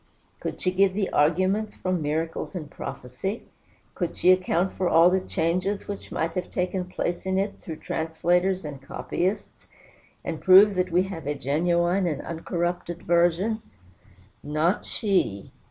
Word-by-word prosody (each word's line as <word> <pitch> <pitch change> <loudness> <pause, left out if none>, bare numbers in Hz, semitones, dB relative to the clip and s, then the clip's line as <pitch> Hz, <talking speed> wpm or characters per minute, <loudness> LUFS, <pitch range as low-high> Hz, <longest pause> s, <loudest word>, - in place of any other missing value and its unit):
Could - - -5
she 185 - 0
give 190 0 +3
the 200 -2 -1
arguments 185 +8 +2
from 185 -2 -1
miracles 160 +5 -2
and 155 -5 -6
prophecy? 130 - -5 0.5
Could 175 -3 -3
she 180 - +5
account 185 0 +2
for 185 -1 0
all 165 +2 +6
the 190 0 +2
changes 185 +3 -1
which 200 -1 -7
might 165 +1 -1
have 180 0 -4
taken 180 0 -2
place 175 -1 -3
in 190 0 0
it 200 +1 -1
through 160 - -6
translators 175 +4 0
and 140 -2 -7
copyists, 185 +8 -3 0.6
and 160 -2 -4
prove 195 +2 +8
that 180 -1 0
we 180 +2 +4
have 175 -6 -6
a 145 - -1
genuine 175 +6 +1
and 150 -4 -2
uncorrupted 175 +1 -3
version? 175 +6 +2 0.8
Not 155 +6 0
she! 185 - 0
180 Hz, 150 wpm, -26 LUFS, 165-190 Hz, 0.8 s, prove